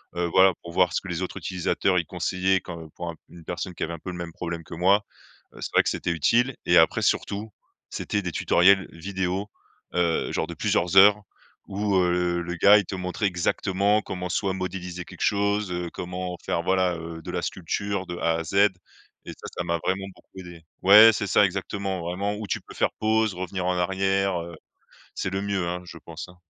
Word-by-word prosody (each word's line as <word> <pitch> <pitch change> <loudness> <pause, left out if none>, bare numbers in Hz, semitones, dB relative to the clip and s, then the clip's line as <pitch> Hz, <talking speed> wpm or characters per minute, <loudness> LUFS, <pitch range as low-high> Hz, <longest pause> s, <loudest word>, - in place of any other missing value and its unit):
heu, 85 0 0
voilà. 95 +2 +5
Pour 85 - -8
voir 90 -2 +3
ce - - 0
que 95 - -9
les 85 +1 -3
autres 90 - -4
utilisateurs, 90 0 0
ils 85 - -3
conseillaient 90 +2 0
quand 85 -2 -8
pour 85 -1 -5 0.2
une 85 -2 -13
personne 90 +1 -5
qui - - -4
avait 85 - -3
un 85 - -7
peu 90 - -7
le - - -7
même 85 -1 -6
problème 85 -1 -5
que 85 - -11
moi, 100 +4 +3 0.5
heu, - - -14
c'est - - -4
vrai - - +5
que - - 0
c'était 85 - -2
utile 120 - +2
et 85 - +5
après 80 - +4
surtout, 105 +2 -1 0.4
c'était 105 - -2
des 90 -2 -4
tutoriels 95 +3 +4
vidéos, 95 +3 -3 0.5
heu, 85 -2 +1
genre - - -1
de - - -6
plusieurs 90 +2 0
heures 105 +1 +7 0.4
où, 100 0 -1
heu, 90 -1 +1
le 85 +1 -4
gars 100 +5 +7
il 100 - 0
te 95 - -5
montrait 90 +3 -3
exactement 95 +3 +1
comment 90 -1 -5
soit 95 +2 0
modéliser 90 -1 -5
quelque - - -12
chose, 100 -1 +1
heu, 90 -1 -3
comment 90 0 -5
faire 85 - -1
voilà, 95 -1 +1
heu, 80 0 -8
de - - -6
la - - -2
sculpture 100 +2 -3
de 85 - -5
a 85 -1 +1
à - - -3
z, 95 - -6 0.7
et - - -5
ça, - - -10
ça 90 - -1
m'a 85 -1 -1
vraiment 95 +1 0
beaucoup - - -21
aidé 85 -3 -11 0.2
ouais 105 +4 +10
c'est 105 - -2
ça 100 - +5
exactement, 95 0 -3
vraiment 95 +4 -2
où 105 0 -6
tu - - -2
peux - - -14
faire - - +1
pause, 110 -1 +2
revenir 90 0 -4
en 90 - +1
arrière, 95 0 +1
heu, 85 0 -8 0.6
c'est - - -2
le 95 +1 -2
mieux, 100 -3 -1
hein, 90 +1 -4
je 85 - -10
pense, 85 +1 -9
hein. 90 - -16
90 Hz, 215 wpm, -25 LUFS, 85-100 Hz, 0.7 s, ouais